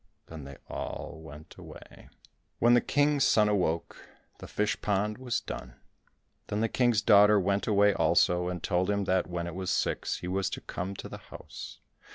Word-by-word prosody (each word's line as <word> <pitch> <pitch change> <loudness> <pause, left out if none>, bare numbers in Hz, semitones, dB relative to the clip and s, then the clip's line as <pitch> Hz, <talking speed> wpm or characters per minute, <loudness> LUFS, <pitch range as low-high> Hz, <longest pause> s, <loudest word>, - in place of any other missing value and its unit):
Then 80 -4 -9
they 70 -1 -10
all - - -6
went 80 -1 -12
away. - - -13 0.5
When 120 +1 +4
the 120 - +5
King's 145 -1 +2
son 105 -4 +4
awoke 90 -5 -2 0.3
the - - -9
fish 105 0 -1
pond 105 +2 -1
was 125 -2 -2
done. 60 -1 -8 0.7
Then 105 - -2
the 115 - +1
King's 120 -3 +2
daughter 105 -1 +6
went 100 +1 0
away 105 -1 +4
also, 90 -1 +2
and 90 -1 -4
told 90 0 0
him 100 -1 +1
that 95 -1 +1
when 85 -1 -4
it 85 - -6
was 95 +1 -4
six - - -1
he 90 - -7
was 95 +1 -1
to - - -6
come 95 +2 -5
to - - -7
the - - -9
house. - - -11
100 Hz, 185 wpm, -29 LUFS, 90-105 Hz, 0.7 s, daughter